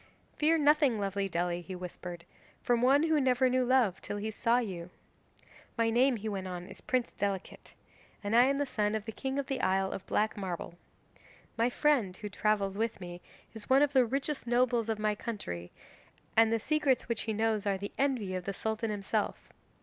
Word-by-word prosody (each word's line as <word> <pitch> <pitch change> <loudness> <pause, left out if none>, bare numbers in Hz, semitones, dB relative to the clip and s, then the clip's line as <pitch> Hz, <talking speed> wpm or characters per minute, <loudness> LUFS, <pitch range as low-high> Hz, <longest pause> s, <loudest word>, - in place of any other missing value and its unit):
'"Fear 315 +2 +3
nothing, 295 -6 +4
lovely 200 0 -1
Dely," 175 0 -1
he 185 +2 -7
whispered, 175 -1 -7 0.4
"from 240 -1 +2
one 275 +4 +5
who 320 -2 +3
never 255 -1 +3
knew 255 0 +2
love 245 -7 +2
till 205 - -4
he 215 +2 -3
saw 230 +2 +2
you. 185 -8 -3 0.9
My 230 0 +2
name," 250 +3 +4
he 220 0 -5
went 195 -3 -3
on, 180 -1 -5
"is - - -11
Prince 255 -2 0
Delicate, 195 -2 -4 0.5
and 205 +2 0
I 240 +1 +7
am 275 +1 +2
the 285 - 0
son 210 -4 0
of 215 -1 -3
the 225 - -4
king 265 +4 -4
of 280 - -1
the 265 -2 -3
Isle 190 0 +1
of 190 - -5
Black 215 +1 +1
Marble. 180 -4 -5 0.8
My 230 +2 +2
friend, 245 -10 +1
who 210 - -6
travels 200 -1 0
with 225 -1 -1
me, 175 -1 -8 0.3
is 220 -2 -9
one 270 +2 +6
of 290 -1 +1
the 260 -2 +6
richest 270 +2 -2
nobles 240 -1 +2
of 220 - 0
my 215 0 +1
country, 195 - -5 0.6
and 225 0 +5
the 230 - +2
secrets 290 0 +1
which 235 -2 -1
he - - +2
knows 215 -1 0
are 195 -1 +1
the 200 +1 -6
envy 255 -9 0
of 185 -1 -4
the 200 - -2
Sultan 220 +1 -2
himself. 210 +1 -2
220 Hz, 200 wpm, -31 LUFS, 195-255 Hz, 0.9 s, I